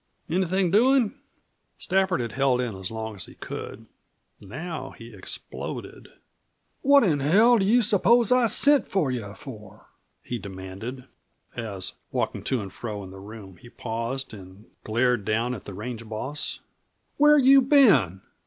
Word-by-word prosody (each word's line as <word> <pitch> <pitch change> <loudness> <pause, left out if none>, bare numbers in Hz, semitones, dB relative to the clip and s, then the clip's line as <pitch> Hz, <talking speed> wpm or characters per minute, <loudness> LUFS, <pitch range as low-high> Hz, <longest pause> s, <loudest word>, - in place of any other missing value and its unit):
"Anything 185 +1 +1
doin'?" 245 +2 +4 0.6
Stafford 190 -4 +1
had 115 -2 -4
held 130 0 +1
in 120 -5 -2
as 95 -1 -6
long 110 0 -5
as 100 - -6
he - - -14
could. - - -8 0.5
Now 155 - -7
he 115 0 -12
exploded. 95 - -7 0.7
"What 280 0 +6
in 160 -9 +2
hell 215 - +5
do 195 - +1
you 235 +4 +4
suppose 230 +3 +3
I 250 -2 +5
sent 280 +5 +3
for 165 -9 0
you 110 -5 -5
for?" 110 -6 -12 0.3
he 120 - -4
demanded, 100 +6 -8 0.5
as, 100 -6 -5 0.2
walking - - -2
to 130 -4 0
and 95 -2 -8
fro 105 -4 -6
in 95 - -10
the 95 - -11
room, 100 -2 -11
he 120 - -15
paused 120 +3 -4
and 95 +1 -13
glared 120 0 +1
down 115 +4 0
at 110 - -8
the 100 - -8
range 115 +1 -7
boss. 130 +7 -4 0.6
"Where 295 +1 +6
you 275 0 +7
been? 235 - +4
125 Hz, 155 wpm, -25 LUFS, -, 0.7 s, you